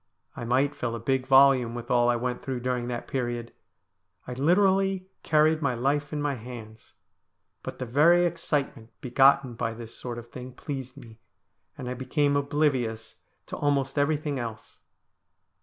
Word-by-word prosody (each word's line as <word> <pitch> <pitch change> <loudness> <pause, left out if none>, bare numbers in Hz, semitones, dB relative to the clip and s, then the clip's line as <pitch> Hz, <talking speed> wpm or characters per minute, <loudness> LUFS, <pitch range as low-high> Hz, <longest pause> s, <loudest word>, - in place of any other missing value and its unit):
I 120 - -6
might 135 +4 +2
fill 115 -4 -3
a - - -5
big 130 +2 -1
volume 135 -3 +5
with 120 0 -6
all 120 -1 +4
I 120 - +3
went 125 +1 -3
through 130 -2 -4
during 125 -1 -2
that 120 -1 -4
period. 120 -2 -3 0.7
I 125 - -6
literally 190 +6 +2 0.2
carried 155 +1 +3
my 135 -4 0
life 140 +4 0
in 150 - -3
my 145 -1 0
hands, 115 -3 -10 0.7
but - - -7
the 130 - -4
very 165 +8 +4
excitement 150 -9 -2
begotten 135 0 +4
by 115 -1 -3
this 115 -1 -9
sort 120 -2 -6
of 120 0 -10
thing 125 0 -8
pleased 130 -2 -6
me, 115 -1 -13 0.6
and 125 - -6
I 125 - -2
became 140 +3 0
oblivious 135 -6 -1 0.3
to - - -6
almost 140 -2 0
everything 145 -1 0
else. 115 -2 -7
130 Hz, 160 wpm, -27 LUFS, 120-145 Hz, 0.7 s, volume